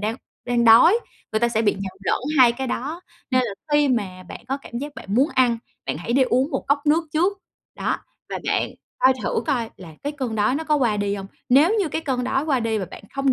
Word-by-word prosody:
đang 215 +2 -2 0.3
đang 240 -1 +2
đói, 235 - +7 0.3
người 215 - +1
ta 235 - +3
sẽ 225 -1 0
bị 205 - +3
nhầm 195 -1 -5
lẫn - - +1 0.2
hai 245 -2 +7
cái 265 +2 -4
đó. 290 +7 -3 0.3
Nên 255 -1 +3
là 215 -4 -4 0.2
khi 295 -1 +4
mà 195 -7 -1
bạn - - -9
có 270 - 0
cảm 235 - -6
giác 290 +2 -6
bạn 195 - -6
muốn 265 +6 +4
ăn, 245 -3 +3 0.3
bạn - - -2
hãy 230 +8 -3
đi 265 +1 +4
uống 260 +3 +1
một - - -2
cốc 280 +1 +4
nước 320 +3 +3
trước. 365 +6 +1 0.4
Đó, - - -1 0.3
và - - -3
bạn - - +1 0.3
coi 260 - +5
thử - - 0
coi 240 -6 0
là 170 -4 -11
cái 290 +1 -2
cơn 260 -6 -4
đói 210 +4 +2
nó 315 +3 -2
có 305 -1 +2
qua 235 -7 +1
đi 200 0 -1
hông. 195 -1 -6 0.2
Nếu 300 - +5
như 370 - 0
cái 315 - -2
cơn 260 -5 -2
đói 270 +2 0
qua 275 -5 +1
đi 225 -1 0
và 195 - -2
bạn - - -10
không 275 -1 +2
255 Hz, 250 wpm, -23 LUFS, 225-285 Hz, 0.4 s, đói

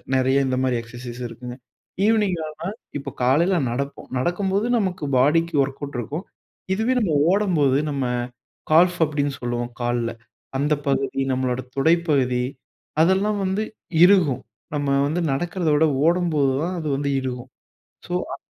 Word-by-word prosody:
நிறைய 130 +1 +3
இந்த 130 -1 0
மாரி 125 -2 +1
எக்ஸர்சைஸ் 120 +1 -9
இருக்குங்க. 120 +2 -9 0.5
ஈவினிங் 210 -5 +2
ஆனா, 155 - -9 0.4
இப்போ 140 - -6
காலைல 170 +9 +3
நடப்போம். 140 +3 -4
நடக்கும்போது 190 - 0
நமக்கு 185 -6 -2
பாடிக்கு 165 +5 +3
ஒர்க்கவுட் 140 0 -6
இருக்கும். 150 - -5 0.5
இதுவே 225 +5 +1
நம்ம 185 -9 +1 0.2
ஓடம்போது, 175 -9 +2
நம்ம 140 -2 -1 0.7
கால்ஃப் 175 +3 +5
அப்பிடீன்னு 145 -2 -1
சொல்லுவோம், 120 0 -2
கால்ல. 120 -1 0 0.5
அந்த 150 +2 +2
பகுதி 135 0 0
நம்மளோட 130 -1 0 0.2
துடைப்பகுதி, 140 -5 +2 0.6
அதெல்லாம் 195 +4 +2
வந்து 190 +3 0 0.4
இறுகும். 180 - +4 0.3
நம்ம 145 -1 -1 0.2
வந்து 165 +4 -1
நடக்கிறத 175 +4 -1
விட 155 +2 +4 0.2
ஓடும்போதுதான் 165 -2 +1
அது 155 - -3
வந்து 140 0 -1
இறுகும். 125 -1 -5 0.6
ஸோ, - - -7 0.2
அ - - -7
145 Hz, 130 wpm, -23 LUFS, 130-175 Hz, 0.7 s, கால்ஃப்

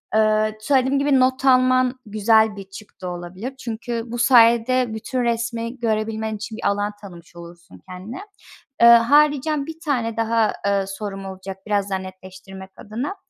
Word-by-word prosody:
ııı, 215 0 +2
söylediğim 265 +3 +1
gibi 280 -1 +2
not 260 +1 +1
alman 255 0 +3
güzel 215 +1 +2
bir 200 - -8
çıktı 195 -2 -11
olabilir. 180 +9 -7
Çünkü 235 0 -5
bu 240 +1 -6
sayede 235 0 +4
bütün 245 +3 -3
resmi 235 +1 -3
görebilmen 220 -1 -2
için 215 +1 -7
bir - - -2
alan 205 +1 -1
tanımış 175 -4 -13
olursun 170 - -14
kendine. 190 - -8 0.6
Iıı, 235 - +8
haricen 290 +3 +2
bir 320 +1 -9
tane 235 -6 -1
daha, 225 -1 +1
ııı, 200 -1 0
sorum 195 0 -6
olacak 190 0 -8
biraz 205 -1 0
daha 190 -1 -2
netleştirmek 190 0 -11
adına. 240 - -5
220 Hz, 150 wpm, -21 LUFS, 195-255 Hz, 0.6 s, Iıı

